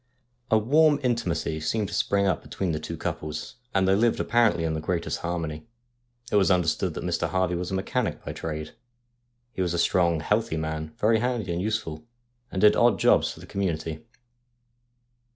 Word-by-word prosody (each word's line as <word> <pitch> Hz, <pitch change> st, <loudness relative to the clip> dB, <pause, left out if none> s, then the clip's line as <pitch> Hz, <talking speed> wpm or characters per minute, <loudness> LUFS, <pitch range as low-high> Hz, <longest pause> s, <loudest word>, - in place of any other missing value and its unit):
A 110 Hz, -, +5 dB
warm 145 Hz, +6 st, +4 dB
intimacy 90 Hz, -10 st, -1 dB
seemed 105 Hz, +6 st, -1 dB
to -, -, -8 dB
spring 100 Hz, 0 st, +1 dB
up 95 Hz, -3 st, +1 dB
between 95 Hz, -3 st, -3 dB
the 75 Hz, -, -2 dB
two 80 Hz, +2 st, -6 dB
couples, 75 Hz, +6 st, -5 dB
and 95 Hz, -1 st, +2 dB
they 95 Hz, -, +4 dB
lived 115 Hz, +3 st, +2 dB
apparently 115 Hz, -8 st, +2 dB
in 80 Hz, -1 st, 0 dB
the 80 Hz, -, -3 dB
greatest 85 Hz, +1 st, -2 dB
harmony. 85 Hz, 0 st, -4 dB, 0.6 s
It -, -, +4 dB
was 100 Hz, -1 st, +4 dB
under 90 Hz, -3 st, +3 dB
stood 80 Hz, -, 0 dB
that -, -, -5 dB
Mr. -, -, -1 dB
Harvey 95 Hz, -1 st, +1 dB
was 90 Hz, +1 st, -3 dB
a 95 Hz, -, -2 dB
mechanic 95 Hz, -, -2 dB
by -, -, -4 dB
trade. 75 Hz, -1 st, -5 dB, 0.8 s
He 95 Hz, -, -3 dB
was 90 Hz, -1 st, 0 dB
a -, -, 0 dB
strong, 85 Hz, -1 st, +2 dB
healthy 105 Hz, -2 st, 0 dB
man, 80 Hz, 0 st, -4 dB
very 110 Hz, +1 st, +3 dB
handy 120 Hz, -5 st, -1 dB
and 85 Hz, -, -2 dB
useful, 95 Hz, -7 st, -3 dB, 0.5 s
and 95 Hz, -, -3 dB
did 105 Hz, -, +7 dB
odd -, -, +4 dB
jobs -, -, +4 dB
for -, -, -11 dB
the -, -, -10 dB
community. 80 Hz, -5 st, -3 dB
90 Hz, 190 wpm, -26 LUFS, 80-105 Hz, 0.8 s, did